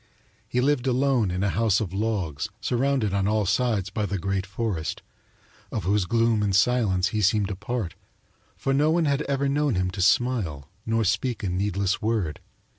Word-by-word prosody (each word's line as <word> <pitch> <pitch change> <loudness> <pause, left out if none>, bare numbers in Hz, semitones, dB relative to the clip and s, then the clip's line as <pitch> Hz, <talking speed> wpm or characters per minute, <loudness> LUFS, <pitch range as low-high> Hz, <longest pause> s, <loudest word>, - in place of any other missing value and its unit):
He 125 - 0
lived 135 -1 +1
alone 130 -4 +2
in 90 +2 -2
a 100 - +1
house 105 +2 +2
of 95 -5 -4
logs 95 -8 -2
surrounded 125 -4 0
on 100 -1 +1
all 105 0 +1
sides 105 -2 0
by 105 0 -1
the 100 - -2
great 95 +1 -2
forest, 95 -5 -3 0.7
of - - -3
whose 100 +1 +1
gloom 115 +1 +2
and 100 -2 +1
silence 100 -4 +2
he 110 - -1
seemed 105 0 +2
a - - -3
part, 100 -1 -3 0.6
for 135 - -1
no 145 +3 +3
one 165 0 +2
had 140 0 +1
ever 140 0 +1
known 145 -3 +1
him 90 0 0
to 95 - -4
smile 95 - +1 0.2
nor 115 0 +1
speak 105 +4 -1
a 95 - -1
needless 100 +1 -1
word. 105 -9 -1
105 Hz, 185 wpm, -25 LUFS, 95-125 Hz, 0.7 s, no